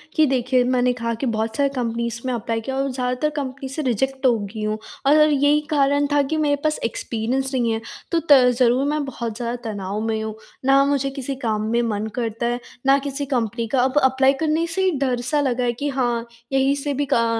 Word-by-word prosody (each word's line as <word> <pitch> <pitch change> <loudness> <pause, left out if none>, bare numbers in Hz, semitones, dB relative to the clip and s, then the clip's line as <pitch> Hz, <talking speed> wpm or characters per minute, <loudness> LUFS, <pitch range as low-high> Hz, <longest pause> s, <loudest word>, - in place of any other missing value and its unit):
कि 315 - +5
देखिए 255 -2 +2
मैंने 250 0 +2
कहा 230 -1 -3
कि - - 0
बहुत 225 -1 -1
सारी 280 -1 +2
कंपनीज़ 235 -1 -2
में 255 - -1
अप्लाई 230 -1 -2
किया 265 +4 -4
और 275 +1 0
ज़्यादातर 250 +3 -1
कंपनी 270 -2 -4
से 275 +4 -4
रिजेक्ट 265 +2 -1
हो 240 -3 +5
गई 205 +1 -6
हूँ। 215 0 -1 0.3
और 290 - +6
यही 290 +1 +3
कारण 285 -1 +2
था 290 0 +4
कि 315 - 0
मेरे 290 -1 +2
पास 305 0 +1
एक्सपीरियंस 250 +4 -2
नहीं 240 -3 +1
है। 225 0 -2 0.3
तो 335 - +3
त 280 - +10 0.2
ज़रूर 250 +2 +3
मैं 300 0 0
बहुत 235 -4 -5
ज़्यादा 240 0 -3
तनाव 200 -1 -4
में 220 0 -1
हूँ। 220 -1 -5 0.3
ना 275 +1 +5
मुझे 280 -1 +1
किसी 275 0 -5
काम 225 -5 -1
में 235 +1 +2
मन 215 -2 -2
करता 230 -1 -2
है, 240 +1 0 0.3
ना 270 +1 +6
किसी 280 0 -4
कंपनी 230 -1 -1
का - - +3
अब 265 +2 0
अप्लाई 265 +1 +4
करने 315 +3 0
से 335 +3 -2
ही 375 - +3
डर 255 -3 0
सा 290 +5 0
लगा 250 -3 0
है 240 -1 +1
कि 290 0 -1
हाँ, 240 -4 -1 0.3
यहीं 270 +1 +3
से 285 0 -2
भी 285 +1 -1
का 230 - +3
255 Hz, 225 wpm, -22 LUFS, 235-275 Hz, 0.3 s, त